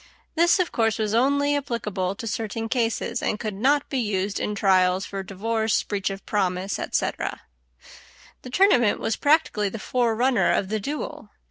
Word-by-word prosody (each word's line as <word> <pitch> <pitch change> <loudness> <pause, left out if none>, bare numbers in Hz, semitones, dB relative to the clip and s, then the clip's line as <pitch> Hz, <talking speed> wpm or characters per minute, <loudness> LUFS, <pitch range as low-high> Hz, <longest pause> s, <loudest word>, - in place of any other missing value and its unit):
This, 340 +3 +4
of 365 -2 0
course, 225 -2 +1
was 215 -2 -1
only 285 +4 +2
applicable 210 -9 -2
to 230 - -7
certain 225 +1 -3
cases, 235 0 -1
and 210 - -1
could 215 -2 -3
not 275 +8 +2
be 270 - -2
used 200 -3 -1
in 210 - -2
trials 185 -2 +3
for 195 -1 -5
divorce, 220 +3 -1
breach 200 -2 -2
of 195 0 -7
promise, 190 -1 -1
etc. - - -2 1.0
The 255 - -9
tournament 250 - +3
was 225 - -1
practically 285 -9 +2
the 225 - -6
forerunner 235 -4 +1
of 190 +2 0
the 215 0 -1
duel. 290 +9 -5
220 Hz, 160 wpm, -24 LUFS, 195-250 Hz, 1.0 s, This